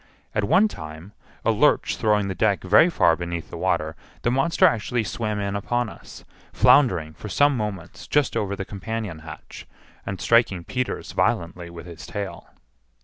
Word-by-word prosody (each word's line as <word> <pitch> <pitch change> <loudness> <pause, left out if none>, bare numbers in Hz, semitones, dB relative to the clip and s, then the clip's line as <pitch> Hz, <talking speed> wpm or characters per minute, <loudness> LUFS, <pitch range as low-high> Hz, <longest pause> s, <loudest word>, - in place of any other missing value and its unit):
At 105 -1 0
one 200 - +4
time, 80 - -9 0.3
a - - +4
lurch - - +2
throwing 105 -2 +1
the 95 - -2
deck 100 0 +1
very 105 - +6
far 85 - +3
beneath 85 -1 -5
the - - -6
water, 80 +1 0 0.3
the 120 - +2
monster 135 +8 +3
actually 120 - +1
swam 105 0 -3
in 100 0 -2
upon 120 +3 -1
us, - - -13 0.3
floundering 90 - +4
for 105 - -9
some 145 +6 +3
moments 95 -5 -5
just 145 -3 +1
over 100 -1 -1
the 95 -1 -5
companion 105 -3 -5
hatch, 80 -1 -11 0.4
and 95 -2 -5
striking 115 -7 +3
Peters 125 +6 -3
violently 85 +1 -1
with 85 -1 -10
his 85 -1 -10
tail. 100 -1 -6
100 Hz, 165 wpm, -24 LUFS, 85-115 Hz, 0.4 s, very